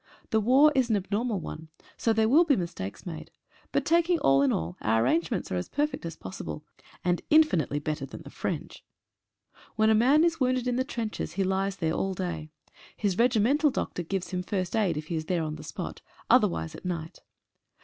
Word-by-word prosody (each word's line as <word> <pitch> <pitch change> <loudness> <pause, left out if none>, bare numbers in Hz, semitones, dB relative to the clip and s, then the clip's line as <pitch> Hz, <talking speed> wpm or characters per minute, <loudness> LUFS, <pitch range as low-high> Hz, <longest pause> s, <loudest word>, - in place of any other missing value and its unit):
The 220 - +3
war 265 +7 +6
is 260 -3 +2
an 220 - +3
abnormal 205 +2 -1
one, 160 -1 -7 0.3
so 230 - +1
there 220 0 +3
will 295 +9 +6
be 300 -5 +3
mistakes 170 - -5
made. 165 -3 -7 0.4
But - - 0
taking 340 +1 +3
all 135 - +4
in 140 -2 +3
all 85 +2 -2
our 110 +1 +2
arrangements 165 +7 0
are 90 - 0
as 90 - -4
perfect 295 - -1
as 165 - -7
possible, 155 -4 -7 0.4
and 175 -1 +1
infinitely 295 - +4
better 150 -2 -3
than - - -10
the - - -11
French. - - -5 0.9
When 220 0 +4
a - - +6
man 260 +8 +5
is 335 -1 +1
wounded 255 -1 +1
in 245 - +1
the 260 - +1
trenches 230 - -4
he 195 +3 0
lies 190 +1 0
there 165 -4 -1
all 190 +2 -1
day. 170 -4 -4 0.5
His 200 -2 -1
regimental 250 +5 +3
doctor 255 -8 -3
gives 185 +2 -3
him 180 -1 -1
first 185 +1 -2
aid 195 -8 +1
if 155 - -4
he 165 - -4
is 155 - -4
there 170 -1 0
on 155 -1 -3
the 155 - -10
spot, 155 - -6 0.3
otherwise 80 -1 +3
at - - -11
night. 165 -3 -4
190 Hz, 200 wpm, -28 LUFS, 160-245 Hz, 0.9 s, war